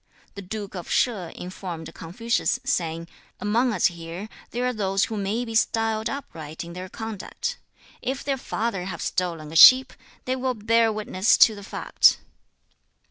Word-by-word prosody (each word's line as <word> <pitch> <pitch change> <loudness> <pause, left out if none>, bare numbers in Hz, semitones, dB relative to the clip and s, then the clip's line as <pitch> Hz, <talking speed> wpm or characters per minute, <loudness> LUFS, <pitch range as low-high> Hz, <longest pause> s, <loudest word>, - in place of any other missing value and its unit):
The 200 - -8
Duke 200 +1 -6
of 175 -3 -7
Sheh 200 -9 +1
informed 180 -3 -7
Confucius, 230 +8 -1
saying, 165 -1 -1 0.3
'Among 235 +5 +1
us 195 -6 +1
here 170 +4 -3 0.2
there 245 +1 -2
are 250 - 0
those 195 -2 +1
who 220 - -5
may 210 +4 -1
be 225 - -6
styled 225 0 +1
upright 160 - -7
in 170 0 -9
their 185 +1 -7
conduct. 225 - -5 0.4
If 265 +1 -3
their 275 -1 -1
father 215 -6 -2
have 175 -3 -5
stolen 165 -4 -2
a - - -8
sheep, 255 +9 +9 0.3
they 255 - 0
will 255 -1 -1
bear 225 +1 +3
witness 210 -2 +2
to 220 - -3
the 205 - -9
fact.' 200 - +3
210 Hz, 160 wpm, -24 LUFS, 180-230 Hz, 0.4 s, sheep